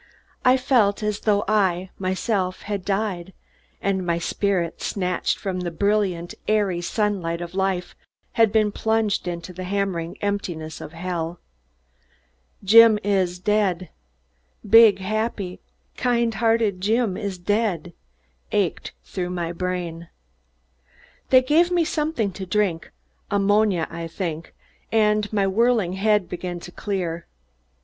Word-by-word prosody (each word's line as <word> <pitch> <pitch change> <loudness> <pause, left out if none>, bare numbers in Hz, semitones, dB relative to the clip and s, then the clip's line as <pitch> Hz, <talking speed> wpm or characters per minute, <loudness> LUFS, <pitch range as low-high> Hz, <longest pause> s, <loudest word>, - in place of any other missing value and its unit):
I 255 +1 +5
felt 230 -6 +2
as 210 -1 -1
though 205 -2 +1
I, 190 -3 +1
myself, 185 0 -1
had 205 -2 -3
died 195 -3 -2 0.5
and 190 -1 0
my 170 -1 0
spirit, 175 -1 -1
snatched 180 -3 -1
from 190 -2 -3
the 180 -1 -2
brilliant, 190 -1 0
airy 205 -5 +1
sunlight 180 -4 -1
of 175 0 -7
life, 190 -2 -1 0.4
had 225 -2 +3
been 215 -1 +2
plunged 220 -3 0
into 175 +1 -5
the 185 +1 -6
hammering 185 -3 -2
emptiness 175 -6 -3
of 155 - -9
hell. 170 0 -4 1.2
"Jim 225 +2 +8
is 190 -3 +1
dead 190 -2 0 0.8
big, 220 -1 +8
happy, 200 -1 -3 0.4
kind 235 -2 +1
hearted 225 -4 +1
Jim 220 0 +1
is 200 -3 -4
dead" 180 -3 -1 0.6
ached - - -1
through 180 - -4
my 175 -2 -3
brain. 175 -2 -4 1.2
They 255 -1 +6
gave 320 +6 +3
me 350 -2 +2
something 300 -10 -1
to 190 +1 -7
drink 185 -4 0 0.4
ammonia, 205 -3 +2
I 165 0 -5
think 165 -2 -5 0.4
and 210 -1 +2
my 205 -2 +1
whirling 215 -2 +2
head 205 0 +2
began 180 0 -5
to 175 - -10
clear. 175 -4 -3
195 Hz, 125 wpm, -23 LUFS, 175-215 Hz, 1.2 s, Jim